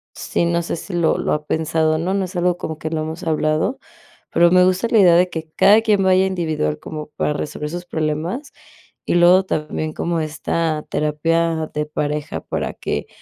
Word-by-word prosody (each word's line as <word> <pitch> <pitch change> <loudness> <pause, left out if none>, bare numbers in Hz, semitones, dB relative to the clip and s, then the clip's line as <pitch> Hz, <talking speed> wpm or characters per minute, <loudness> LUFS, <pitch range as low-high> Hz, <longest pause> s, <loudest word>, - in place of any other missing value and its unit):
sí, - - -1
no 170 0 +1
sé 170 - -3
si, 190 - -8
lo 170 -2 +2
lo - - -1
ha 150 0 -2
pensado 160 0 +1
o - - -1
no 180 +4 -1
no 195 -1 0
es 185 +1 -10
algo 180 0 +1
como 160 -3 -5
que 155 - -4
no 160 -1 -1
hemos 160 +1 -6
hablado, 155 - 0 0.5
pero 170 0 +5
me 180 0 +6
gusta 185 +5 +1
la 230 - +4
idea 180 -4 +6
de 180 +1 +4
que 160 -2 -5
cada 210 +2 +6
quien 210 -3 +2
vaya 190 0 +4
individual, 160 - -1
como 155 -1 -7
para 150 - 0
resolver 150 0 -4
sus 175 +2 -6
problemas, 160 - -3 0.5
y - - 0
luego 175 +2 +6
también 155 -2 -3
como 170 +1 -1
esta 155 0 -2
terapia 160 +1 0
de 150 0 -1
pareja 150 0 -3
para - - -3
que - - -4
165 Hz, 200 wpm, -20 LUFS, 155-180 Hz, 0.5 s, me